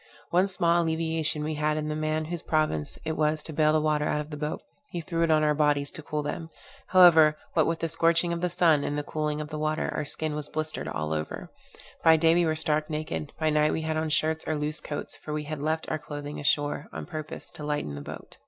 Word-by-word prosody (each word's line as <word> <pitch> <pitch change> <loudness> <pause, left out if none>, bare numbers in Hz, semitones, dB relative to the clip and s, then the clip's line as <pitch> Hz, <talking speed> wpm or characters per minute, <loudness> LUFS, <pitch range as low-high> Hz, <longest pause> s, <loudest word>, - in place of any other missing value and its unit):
One 180 +3 +4
small 175 -3 +2
alleviation 160 -2 0
we 155 +1 -2
had 150 0 0
in 150 0 -2
the 155 - -2
man 155 0 -1
whose 170 +1 -4
province 155 - 0
it 160 - -1
was 155 0 +1
to 160 - -6
bale 155 0 +3
the 155 - +3
water 150 -1 +1
out 150 - 0
of 150 +1 -6
the - - -4
boat; 150 +1 -4 0.3
he 175 - -4
threw 165 +1 -3
it 165 - +3
on 155 -1 +4
our 150 0 +3
bodies 145 -1 +1
to 160 - -8
cool 150 0 -3
them. 165 +2 -4 0.4
However, 160 -5 +7 0.2
what 160 -3 +3
with 165 0 -1
the 165 - +1
scorching 165 +1 +2
of 170 - -3
the 180 - +1
sun 160 -5 +3
and 145 0 -2
cooling 150 0 -2
of 150 -1 -5
the 155 -1 -5
water, 155 0 -1
our 155 - -2
skin 155 +1 -1
was 150 -1 -2
blistered 155 0 -3
all 80 0 -2
over. 75 0 -4 0.5
By 160 -1 +7
day 165 +1 +4
we 170 0 +3
were 155 - +1
stark 155 -1 +1
naked; 150 - -4
by 155 -1 +2
night 150 0 +3
we - - -1
had 160 0 -2
on 155 0 -1
shirts 160 +1 +1
or 155 - 0
loose 150 +1 -2
coats; 150 -1 -5
for 150 - -7
we 150 0 -2
had 150 -1 -5
left 160 +2 -1
our 155 - -1
clothing 145 0 -6
ashore, 145 +1 0
on - - -6
purpose 155 -2 -6
to 150 - -8
lighten 145 - -2
the 70 - -6
boat. - - -9
155 Hz, 245 wpm, -27 LUFS, 150-160 Hz, 0.5 s, However